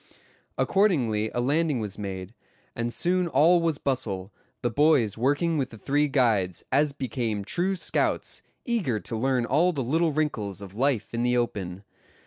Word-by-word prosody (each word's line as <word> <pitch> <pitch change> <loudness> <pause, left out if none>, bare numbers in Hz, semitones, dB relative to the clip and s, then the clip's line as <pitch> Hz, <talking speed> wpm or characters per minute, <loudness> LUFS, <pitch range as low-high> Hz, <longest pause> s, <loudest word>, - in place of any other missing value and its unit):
Accordingly 125 - +2
a - - -2
landing 145 +1 +1
was 105 -3 -5
made, 95 0 -5 0.4
and 115 0 -2
soon 180 +7 +1
all 165 +4 +4
was 165 -3 0
bustle, 110 -9 -2 0.3
the 120 - +1
boys 140 -6 +3
working 145 +7 +1
with 135 - -1
the 110 - -11
three 145 +7 +1
guides, 110 - +1
as 145 +2 +3
became 120 -6 -3
true 185 - 0
scouts, 170 - -1 0.2
eager 190 - 0
to 115 - -5
learn 125 +1 +1
all 160 +9 +3
the 140 -6 -2
little 160 +6 +1
wrinkles 110 - -2
of 100 -2 -9
life 120 -1 0
in 115 - -1
the 125 0 +2
open. 100 -6 -3
130 Hz, 160 wpm, -26 LUFS, 110-155 Hz, 0.4 s, all